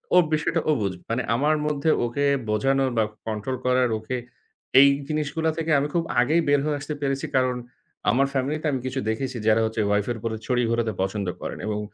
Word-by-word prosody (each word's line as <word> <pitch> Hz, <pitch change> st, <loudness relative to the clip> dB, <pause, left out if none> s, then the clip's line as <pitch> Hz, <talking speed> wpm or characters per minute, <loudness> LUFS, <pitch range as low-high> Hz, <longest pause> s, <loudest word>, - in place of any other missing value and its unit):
ওর 180 Hz, -, +7 dB
বিষয়টা 155 Hz, +2 st, +1 dB
ও -, -, +6 dB
বুঝবে। 95 Hz, -3 st, -3 dB
মানে 115 Hz, +2 st, 0 dB
আমার 150 Hz, +5 st, +2 dB
মধ্যে 150 Hz, +1 st, 0 dB, 0.2 s
ওকে 140 Hz, +5 st, -1 dB, 0.2 s
বোঝানোর 135 Hz, +5 st, +2 dB
বা 110 Hz, -, +4 dB, 0.2 s
কন্ট্রোল 110 Hz, +4 st, -3 dB
করার 125 Hz, -1 st, +3 dB
ওকে, 120 Hz, +4 st, -4 dB, 0.6 s
এই 140 Hz, -, +9 dB, 0.2 s
জিনিসগুলা 155 Hz, +1 st, -1 dB
থেকে 165 Hz, 0 st, -1 dB
আমি 145 Hz, -, 0 dB
খুব 170 Hz, -, +1 dB, 0.2 s
আগেই 155 Hz, +7 st, +3 dB
বের 145 Hz, 0 st, +4 dB
হয়ে 150 Hz, -1 st, 0 dB
আসতে 145 Hz, +1 st, -5 dB
পেরেছি। 135 Hz, -1 st, -1 dB
কারণ 130 Hz, -1 st, +2 dB, 0.6 s
আমার 135 Hz, +3 st, +3 dB
ফ্যামিলি 140 Hz, +3 st, 0 dB
তে -, -, -1 dB
আমি 135 Hz, -, -1 dB
কিছু 130 Hz, +1 st, -2 dB
দেখেছি 130 Hz, +3 st, -2 dB
যারা 110 Hz, +1 st, +5 dB
হচ্ছে 110 Hz, 0 st, -1 dB
ওয়াইফ 105 Hz, 0 st, +2 dB
এর 120 Hz, -, -3 dB
উপরে 110 Hz, +1 st, -3 dB
ছড়ি 125 Hz, -1 st, +1 dB
ঘোরাতে 115 Hz, -2 st, 0 dB
পছন্দ 95 Hz, 0 st, -2 dB
করেন -, -, -5 dB
এবং 105 Hz, -1 st, -1 dB
130 Hz, 200 wpm, -24 LUFS, 115-145 Hz, 0.6 s, এই